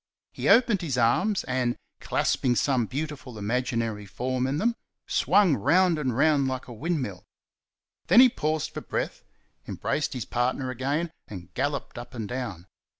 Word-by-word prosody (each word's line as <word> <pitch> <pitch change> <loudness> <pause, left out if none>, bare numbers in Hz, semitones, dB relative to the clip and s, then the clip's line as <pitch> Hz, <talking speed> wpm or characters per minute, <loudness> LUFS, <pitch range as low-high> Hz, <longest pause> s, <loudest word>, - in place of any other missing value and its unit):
He - - -2
opened 230 -5 +5
his 145 -7 -2
arms 155 - +2
and, 125 -1 -1 0.2
clasping 125 -2 +1
some 125 -3 +1
beautiful 140 -3 -5
imaginary 115 -1 -2
form 125 +6 -2
in 135 +2 -1
them, 230 +7 +1 0.3
swung 195 -7 +3
round 170 - +3
and 130 -5 -1
round 145 -2 +3
like 130 -1 -4
a 120 - -8
windmill. 125 - -3 0.8
Then - - +7
he 255 - +10
paused 155 - -2
for - - -6
breath, - - -3 0.5
embraced 150 - -2
his 125 -4 -4
partner 130 +2 -1
again, 140 +7 -1 0.2
and 90 -3 -10
"galloped" 140 -3 -2
up 120 +1 -10
and 110 -3 -4
down. 120 -9 -5
130 Hz, 150 wpm, -26 LUFS, 120-155 Hz, 0.8 s, he